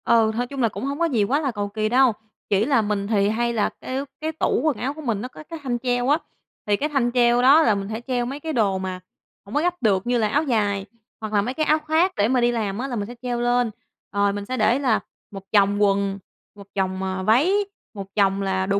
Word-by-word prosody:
Ừ, 225 -2 +4
thôi 245 +2 -1
chung 275 +1 -5
là 230 - +3
cũng 235 - -6
hông 280 +2 -3
có 340 - +3
gì 245 -10 +1
quá 260 +8 +1
là 275 -4 -1
cầu 205 -3 -3
kì 215 +1 -1
đâu, 255 0 +4 0.4
chỉ 205 +1 +2
là 270 -4 +3
mình 205 -1 -2
thì 205 -2 +2
hay 235 +2 0
là 215 -3 +1
cái 265 +2 -3 0.2
cái 315 +1 -1
tủ 315 - 0
quần 310 -4 +1
áo 270 +3 -2
của 310 - -9
mình 230 -8 -1
nó 250 - -4
có 260 - -12
cái 330 -1 -6
thanh 245 -3 -1
treo 245 +1 0
á, 295 - +5 0.5
thì 205 - +2
cái 295 +8 -2
thanh 265 -5 +1
treo 240 -1 +4
đó 275 +5 +7
là 220 -9 +3
mình 195 0 -4
sẽ 220 +1 -4
treo 245 -2 0
mấy 275 +4 -5
cái 315 +1 -4
đồ 205 -6 +2
mà 185 -1 -4 0.5
hổng 200 - -8
có 295 - +3
gấp 355 +1 +1
được, 200 -2 +1
như 245 0 +2
là 220 -2 +2
áo 285 +9 +1
dài 205 -7 0 0.4
hoặc 215 -1 -5
là 205 - +4
mấy 245 +5 -3
cái 310 +2 -1
áo 310 +1 +3
khoác 320 +4 +1
để 205 - +2
mà 250 +1 +2
đi 240 0 +3
làm 210 -4 -2
á, 265 - -2
là 250 - -4
mình 205 -3 -3
sẽ 240 - -9
treo 245 -1 -2
lên. 245 -1 +1 0.4
Rồi 200 0 +1
mình 205 0 -5
sẽ 255 +4 -3
để 230 +3 +3
là 250 -6 +2 0.3
một 195 -2 -8
chồng 205 0 +3
quần, 200 -1 +1 0.4
một 200 -1 -13
chồng, 190 -1 -1
à, 190 0 -3
váy, 245 - +4 0.4
một 200 -3 -7
chồng 195 -1 +2
là 190 -1 0
đồ 200 +1 +1
235 Hz, 270 wpm, -23 LUFS, 200-265 Hz, 0.5 s, đó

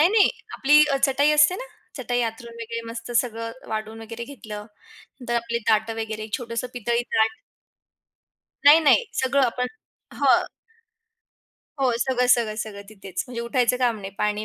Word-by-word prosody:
नाही, 320 - +6
नाही, 430 -2 +5 0.3
आपली 295 +2 +5 0.2
चटाई 280 +2 +3
असते 300 +4 +5
ना, - - -6 0.3
चटाई 245 -1 -1
अंथरून 235 +1 -10
वगैरे 230 0 -4
मस्त 230 +1 -7
सगळं 230 0 -7
वाढून 220 +1 -4
वगैरे 230 +1 -7
घेतलं 215 -6 -9 0.6
तर 240 - 0
आपले 235 0 -3
ताटं 220 +1 +2
वगैरे 220 0 -5
छोटंसं 235 0 -4
पितळी 235 +1 0
ताट. 220 0 +2 1.3
नाही, 295 +3 +9
नाही, 315 - +4 0.2
सगळं 270 +1 +2
आपण 250 +1 -1 0.5
हं. - - +4 1.4
हो, 260 - +3
सगळं-सगळं-सगळं 235 -5 +1
तिथेच 195 -3 -6
म्हणजे 245 -2 -6
उठायचं 245 +1 +1
काम 245 -3 +1
नाही, 195 0 -7
पाणी 210 0 0
235 Hz, 140 wpm, -24 LUFS, 220-255 Hz, 1.4 s, नाही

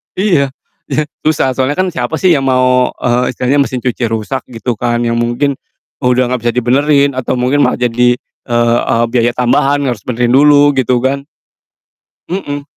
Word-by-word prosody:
Iya 170 -9 +1 0.4
iya 150 +3 +1 0.2
susah, 145 -4 +1
soalnyakan 145 +8 0
siapa 125 +1 -3
sih 185 -2 +3
yang 135 - -1
mau, 125 -1 +2
eee, 125 +1 +1
istilahnya 140 +4 +1
mesin 130 - -4
cuci 125 -1 -1
rusak 115 +4 -3
gitu 120 +1 -3
kan 120 -1 0
yang 115 - 0
mungkin 125 +4 0 0.5
udah 125 0 +2
gak - - -4
bisa 120 - +2
dibenerin 140 +3 +2
atau 130 - -2
mungkin 130 +4 +1
malah - - 0
jadi, 120 +1 +2
eee 120 0 -1
eee, 115 0 +2
biaya 120 -1 +2
tambahan, 135 +3 +1
harus 120 -5 -3
benerin 120 0 0
dulu 145 0 +5
gitu 125 -1 +2
kan 140 +1 -1 1.1
Mhm. 145 -6 -4
125 Hz, 165 wpm, -13 LUFS, 120-140 Hz, 1.1 s, dulu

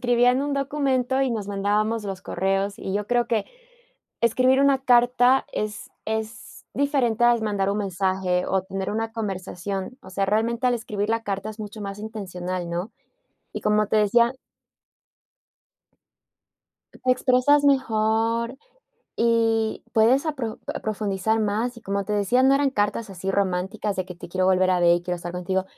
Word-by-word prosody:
escribían 245 +2 +3
un 290 0 -2
documento 270 -2 0
y 265 - +1
nos 210 -4 -3
mandábamos 210 +2 0
los 195 -2 -5
correos, 195 +2 -1
y 190 - -5
yo 205 0 -1
creo 240 -1 +1
que 225 -4 0 0.8
escribir 255 +3 +3
una 275 -1 +4
carta 245 +1 +4
es 210 -1 -4
es 220 0 -5
diferente 255 -5 +1
al 240 -1 +4
mandar 200 -2 0
un 205 - -1
mensaje 185 -2 0
o 190 -1 +1
tener 190 0 -4
una 225 +1 -2
conversación. 195 +1 -4
O 190 - -12
sea, 195 +1 0
realmente, 230 +4 +1
al 245 - +3
escribir 210 -3 -3
la 225 0 0
carta 200 0 -3
es 215 - -12
mucho 215 0 -7
más 200 0 -6
intencional, 185 -5 -5
¿no?, 175 +6 -4 0.6
y - - -6
como 210 0 +2
te 220 - +1
decía 235 +4 +4 2.6
te - - -17
expresas 255 +3 +3
mejor 230 -2 +1 0.6
y 225 -1 +1
puedes 240 +6 +4
a 310 - 0
pro 230 -5 -4 0.2
profundizar 215 0 -1
más, 220 +4 -1
y 235 - -12
como 200 0 -2
te 210 - -4
decía, 210 +5 +2
no 270 +1 +5
eran 280 -1 +2
cartas 205 -2 -1
así 190 +1 -4
románticas 195 +1 -1
de 185 - -1
que: 180 - -8
"Te 175 - -10
quiero 185 +1 0
volver 185 0 +3
a 180 - +2
ver 175 0 +5
y 175 - -5
quiero 180 0 -3
estar 175 0 -7
contigo", 185 +1 -1
215 Hz, 165 wpm, -24 LUFS, 195-240 Hz, 2.6 s, no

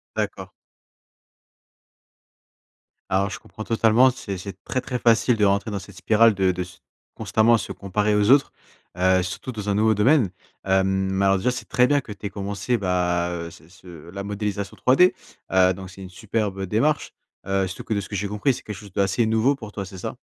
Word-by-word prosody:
D'accord. - - -3 2.6
Alors, 95 +2 +1
je - - -7
comprends 110 - -10
totalement. 115 +3 +4
C'est 100 -6 -5
c’est 95 +2 -9
très 130 - -1
très 125 -1 -4
facile 115 0 +3
de 105 - +3
rentrer 100 +2 +1
dans 100 - -3
cette 100 0 -13
spirale, 110 +3 +4
de 95 -1 +2
de 90 0 -4
s 90 0 -14 0.4
constamment 115 +2 +3
se - - -6
comparer 105 +2 -1
aux 105 +1 +2
autres, 140 0 +5 0.5
heu, 95 0 +3
surtout 90 +7 -5
dans 105 -2 -5
un 100 - +1
nouveau 110 +1 +3
domaine. 115 +2 +3 0.4
Hem, 95 0 +3 0.3
mais 95 +1 0
alors, 95 0 +4
déjà, 125 +7 +1
c’est 125 - -7
très 125 0 +4
bien 145 +1 +2
que 120 - -11
tu 105 0 -9
aies - - -1
commencé, 100 +3 -2
bah, 90 -3 0
heu, 85 -1 -5
ce 80 0 -17
ce 85 -3 -13
la 100 +1 -6
modélisation 100 -1 -4
3D. 160 +9 +6 0.4
Heu, 95 0 +5
donc 95 0 -9
c'est 95 +1 -12
une 95 - -8
superbe 100 0 -3
démarche. 125 +11 0 0.3
Heu, 95 0 +1
surtout 95 - -8
que, 115 - -2
de 100 - 0
ce 100 - -10
que 105 - -5
j'ai 100 +2 -2
compris, 105 +7 0
c'est - - -9
quelque 105 - -6
chose 105 -1 -12
d'assez 100 +5 +1
nouveau 110 +5 +2
pour 110 -6 -10
toi, 100 -1 -5
c'est 95 0 -10
ça? - - -6
100 Hz, 205 wpm, -23 LUFS, 95-110 Hz, 2.6 s, 3D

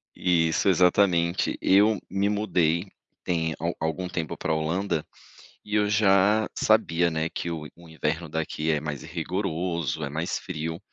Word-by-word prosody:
Isso, 85 +1 +2
exatamente. 90 -1 +3
Eu 105 +2 +4
me 100 +2 0
mudei 90 -4 0 0.3
tem 80 -2 -1
a 85 +3 -2
algum 80 +3 -2
tempo 85 -3 -3
pra - - -1
Holanda, 80 +1 -1 0.6
e 105 - -5
eu 105 -1 +2
já 105 +1 +4
sabia, 85 -6 +2
né, 80 +1 -2
que 85 - -4
o 80 -2 -5
o 85 -1 -16
inverno 80 +1 -2
daqui 80 0 -2
é 75 -2 +1
mais 75 -2 -5
rigoroso, 85 -1 -2
é 70 - -4
mais 80 +4 -2
frio, 80 -2 -5
85 Hz, 150 wpm, -26 LUFS, 80-95 Hz, 0.6 s, Eu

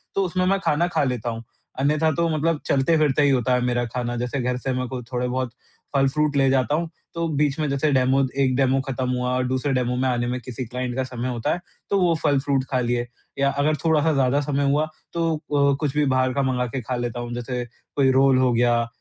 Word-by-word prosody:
तो 195 - +2
उसमें 185 +1 0
मैं 195 +1 +2
खाना 170 +4 +2
खा 175 - 0
लेता 125 -3 -1
हूँ। 115 0 -5 0.4
अन्यथा 150 +3 +2
तो 170 +2 +1
मतलब 160 0 +1
चलते-फिरते 150 +1 +2
ही 145 - +4
होता 130 -2 +2
है 125 - +2
मेरा 120 0 0
खाना 120 +1 -3
जैसे 125 +3 -2
घर 125 0 -1
से 130 +1 -2
मैं 130 0 -2
कुछ 125 -2 -6
थोड़े-बहुत 125 0 -1 0.4
फल-फ्रूट 145 +2 +2
ले 135 -1 +4
जाता 130 +1 +2
हूँ, 165 +1 -2 0.2
तो 170 0 -1
बीच 145 -1 +1
में 155 - 0
जैसे 140 +2 +1
डेमो 130 0 +3 0.2
एक 130 -1 +1
डेमो 135 0 +2
खत्म 130 -1 -2
हुआ 125 0 -1
और 130 - +1
दूसरे 130 +2 -1
डेमो 125 -1 0
में 130 +1 +1
आने 120 -1 0
में 125 +1 -2
किसी 125 +2 -6
क्लाइंट 125 +1 -4
का 130 - 0
समय 125 -1 -4
होता 120 -2 -1
है, - - -3 0.3
तो 200 - +2
वो 175 -2 +3
फल-फ्रूट 140 -2 +2
खा 130 - +2
लिए। 120 0 0 0.3
या 140 0 +3
अगर 145 +2 +1
थोड़ा-सा 160 0 +3
ज़्यादा 135 0 +2
समय 145 0 -1
हुआ, 150 +2 +1 0.3
तो 165 -1 0 0.2
ओ 140 -1 +3
कुछ 145 -2 -1
भी 150 - +3
बाहर 130 -1 +1
का 140 - 0
मँगा 130 -2 0
के 125 +2 -4
खा 125 +3 -3
लेता 120 -1 -3
हूँ, 120 0 -5
जैसे 120 +1 -3 0.3
कोई 135 -2 +4
रोल 135 0 +4
हो 130 -1 +3
गया 120 0 +2
130 Hz, 235 wpm, -23 LUFS, 125-145 Hz, 0.4 s, ही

